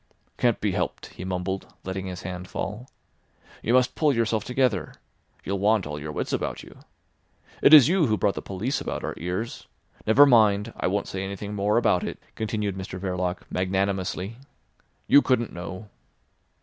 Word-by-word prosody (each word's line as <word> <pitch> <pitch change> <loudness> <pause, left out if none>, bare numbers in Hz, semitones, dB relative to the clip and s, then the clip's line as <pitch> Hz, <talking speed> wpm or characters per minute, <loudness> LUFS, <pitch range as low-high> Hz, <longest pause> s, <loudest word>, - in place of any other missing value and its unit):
"Can't 120 -2 +1
be 105 - 0
helped," - - -3
he - - -8
mumbled, 95 +1 -3
letting 95 0 -4
his 90 -1 -6
hand 90 0 -6
fall. 105 +9 -5 0.7
"You 120 - +2
must 130 -1 +3
pull 150 -2 +2
yourself 115 -3 0
together. 125 -6 0 0.5
You'll 100 +1 -2
want 105 0 +3
all 75 0 -5
your 75 +1 -6
wits - - -3
about - - -2
you. - - -14 0.8
It - - +6
is 150 -5 +10
you 175 -3 +3
who 110 -1 +1
brought 100 -1 +2
the - - -5
police 110 +9 -3
about - - -4
our - - -3
ears. 90 +7 -4 0.4
Never 130 +7 +8
mind, 110 -4 +4
I - - -1
won't 100 +2 -1
say 95 0 -4
anything 100 +1 -5
more 105 +1 +1
about 110 -6 +3
it," - - -4 0.2
continued 105 -3 -2
Mr 95 -1 -6
Verloc 90 -1 -2
magnanimously. 95 +2 -1 0.7
"You 145 - +7
couldn't 125 -5 0
know." 90 +4 -7
100 Hz, 170 wpm, -25 LUFS, 95-115 Hz, 0.8 s, is